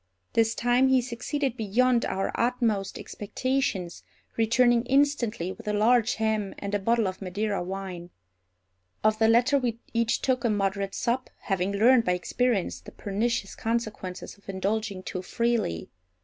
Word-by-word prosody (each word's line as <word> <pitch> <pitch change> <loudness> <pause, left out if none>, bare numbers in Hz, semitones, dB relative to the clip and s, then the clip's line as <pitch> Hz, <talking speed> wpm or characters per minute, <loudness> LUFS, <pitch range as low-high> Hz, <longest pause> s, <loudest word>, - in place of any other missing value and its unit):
This 225 0 +2
time 245 +2 +3
he 265 0 +4
succeeded 250 +2 -2
beyond 240 +3 +2
our 195 +1 -1
utmost 230 -5 0
expectations, 210 -5 -2 0.3
returning 235 +1 +3
instantly 260 - +1
with - - -11
a 210 - 0
large 230 +2 +3
ham 220 -2 -1
and 200 0 -5
a 205 - +2
bottle 230 +1 +2
of 185 +1 -5
Madeira 200 +2 -2
wine. 185 -1 -6 0.9
Of 215 0 +3
the 220 - +5
latter 245 +5 +4
we 240 -3 -1 0.2
each 230 -1 +1
took 255 -2 +1
a 235 - +2
moderate 195 -1 -1
sup, 250 +2 -1
having 195 0 -1
learned 235 +4 +5
by 180 - +2
experience 190 - 0
the 90 - -12
pernicious 205 0 -2
consequences 215 -5 -4
of 200 - -17
indulging 195 0 -2
too 185 - -4
freely. 230 - -1
220 Hz, 150 wpm, -27 LUFS, 195-240 Hz, 0.9 s, the